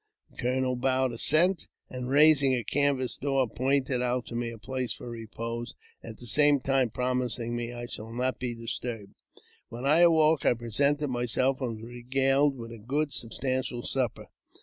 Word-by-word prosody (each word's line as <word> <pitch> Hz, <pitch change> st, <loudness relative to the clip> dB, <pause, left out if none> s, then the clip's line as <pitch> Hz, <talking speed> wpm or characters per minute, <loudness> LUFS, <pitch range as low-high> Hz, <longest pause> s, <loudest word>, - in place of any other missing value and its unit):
The -, -, -24 dB
colonel 125 Hz, +1 st, 0 dB
bowed 130 Hz, 0 st, +1 dB
assent, 155 Hz, +9 st, +2 dB, 0.2 s
and, 125 Hz, 0 st, -6 dB
raising 145 Hz, -2 st, +5 dB
a 120 Hz, -, -2 dB
canvas 140 Hz, -2 st, 0 dB
door, 135 Hz, -2 st, +1 dB
pointed 130 Hz, +1 st, 0 dB
out 125 Hz, 0 st, 0 dB
to 115 Hz, -, -8 dB
me 120 Hz, 0 st, -2 dB
a 115 Hz, -, -8 dB
place 130 Hz, +2 st, -3 dB
for -, -, -10 dB
repose, 115 Hz, +1 st, -6 dB, 0.3 s
at 110 Hz, -2 st, -9 dB
the 125 Hz, -, -12 dB
same 145 Hz, +3 st, +4 dB
time 135 Hz, -1 st, +1 dB
promising 125 Hz, -1 st, -1 dB
me 120 Hz, 0 st, -3 dB
I 120 Hz, 0 st, -6 dB
should 110 Hz, -1 st, -7 dB
not 130 Hz, +2 st, -1 dB
be 125 Hz, -2 st, -3 dB
disturbed. 115 Hz, -3 st, -6 dB, 0.5 s
When 120 Hz, +3 st, -7 dB
I 150 Hz, +4 st, +4 dB
awoke, 160 Hz, -3 st, +5 dB
I -, -, +3 dB
presented 140 Hz, +6 st, 0 dB
myself, 125 Hz, +2 st, 0 dB
and 120 Hz, -3 st, -2 dB
was 110 Hz, -, -11 dB
regaled 135 Hz, +3 st, +1 dB
with 115 Hz, -1 st, -8 dB
a 115 Hz, -, -9 dB
good 140 Hz, +6 st, -1 dB
substantial 125 Hz, +1 st, -2 dB
supper. 130 Hz, -5 st, -2 dB
125 Hz, 170 wpm, -28 LUFS, 120-135 Hz, 0.5 s, raising